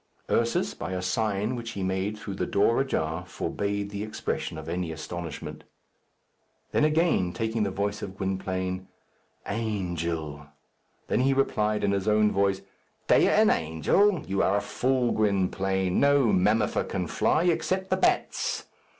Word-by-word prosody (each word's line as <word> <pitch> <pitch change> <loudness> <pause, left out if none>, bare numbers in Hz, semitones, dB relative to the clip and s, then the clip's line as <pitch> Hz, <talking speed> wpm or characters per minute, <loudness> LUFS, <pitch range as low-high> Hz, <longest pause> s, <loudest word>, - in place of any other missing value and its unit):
Ursus, - - +1
by 95 - -5
a 90 - -2
sign 105 +4 0
which 115 -1 -6
he 100 - -4
made 95 +3 -1
through 105 -2 -6
the - - -2
door 105 +5 +3
ajar, 80 -10 -1
forbade 100 +2 -3
the 100 0 -4
expression 110 -6 -3
of 80 0 -8
any 85 0 -2
astonishment. 80 +1 -6 1.1
Then, - - +2
again 155 - +2
taking 110 -1 -1
the 100 - +1
voice 100 +2 -2
of 95 0 -7
Gwynplaine, 95 -1 -3 0.6
"Angel!" 85 -9 -3 0.6
Then - - 0
he 135 +2 +3
replied 105 -6 +1
in 100 - +2
his 100 0 -1
own 105 0 +4
voice, 100 -1 +1 0.5
"Dea - - +6
an - - +5
angel! 115 - +2
You 95 +1 0
are 100 - +3
a - - 0
fool, 130 -1 0
Gwynplaine. 95 -2 +1
No 140 -5 +4
mammifer 105 +3 +2
can - - -3
fly 160 - +1
except 185 +2 0
the - - +3
bats." 360 0 0
100 Hz, 150 wpm, -27 LUFS, 95-115 Hz, 1.1 s, Dea